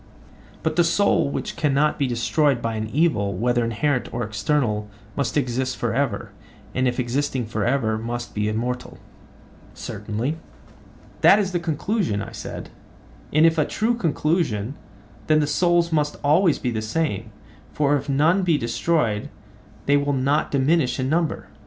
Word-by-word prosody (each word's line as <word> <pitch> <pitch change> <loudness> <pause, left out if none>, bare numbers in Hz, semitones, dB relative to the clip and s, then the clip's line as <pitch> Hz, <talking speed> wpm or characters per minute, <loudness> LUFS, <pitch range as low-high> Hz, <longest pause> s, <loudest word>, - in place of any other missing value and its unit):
But - - -1
the 175 - +6
soul 170 -2 +2
which - - -4
cannot 150 0 +1
be 140 - +2
destroyed 125 +3 +1
by 115 -1 -2
an 110 0 -3
evil, 120 - +1
whether 120 +4 +1
inherent 125 +4 -1
or 120 - -2
external, 105 0 -1 0.3
must 140 +1 -1
exist 130 -1 -1
for 120 -2 -1
ever, 120 -5 -1 0.4
and 130 0 +1
if 125 +1 -1
existing 130 0 -1
for 110 - -3
ever, 115 -4 +1
must 120 +1 -5
be 105 0 0
immortal? 125 +3 -3 0.8
Certainly. 120 +9 -4 0.8
That 195 - +7
is 200 -3 0
the 175 - 0
conclusion, 170 - -1
I - - -6
said; - - -7 0.6
and, 155 +2 +5
if 165 0 +3
a - - +5
true 220 +8 0
conclusion, 155 - 0 0.5
then 155 0 +4
the 150 - +2
souls 170 +3 +2
must 150 -2 +1
always 160 +3 +4
be 125 - -2
the 110 -2 -2
same, 110 -2 -2 0.4
for 145 -1 +2
if 140 0 -3
none 155 +7 +3
be 170 -4 +2
destroyed 115 -2 0 0.6
they 145 +1 +4
will 145 0 0
not 140 +3 +1
diminish 140 0 +2
in 130 0 0
number. 165 +1 0
140 Hz, 160 wpm, -23 LUFS, 115-155 Hz, 0.8 s, That